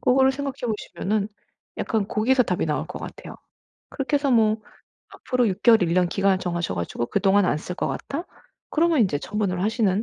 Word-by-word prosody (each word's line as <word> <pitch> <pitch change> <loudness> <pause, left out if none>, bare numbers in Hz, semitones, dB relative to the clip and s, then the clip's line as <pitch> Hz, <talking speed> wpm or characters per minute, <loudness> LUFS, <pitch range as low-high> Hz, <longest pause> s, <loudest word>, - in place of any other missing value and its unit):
그거를 265 +1 +4
생각해 275 -1 -4
보시면은 210 -1 -2 0.5
약간 215 -3 -1
거기서 250 +4 +3
답이 180 -4 -1
나올 150 +1 -1
것 180 - -7
같아요. - - -9 0.5
그렇게 285 +2 -1
해서 280 -1 0
뭐 220 -2 +4 0.5
앞으로 250 -3 0
6 190 +2 -4
개월, 225 -5 +6
1 170 0 +1
년 180 -1 +3
기간을 195 -1 +2
정하셔 175 - -2
가지고 85 +7 -3
그동안 200 0 +3
안 - - +1
쓸 180 - -6
것 - - -1
같다? 310 +6 -4 0.4
그러면 325 -2 +3
이제 180 -10 +2
처분을 190 -1 -2
하시는 215 -2 +1
210 Hz, 375 characters per minute, -24 LUFS, 180-250 Hz, 0.5 s, 개월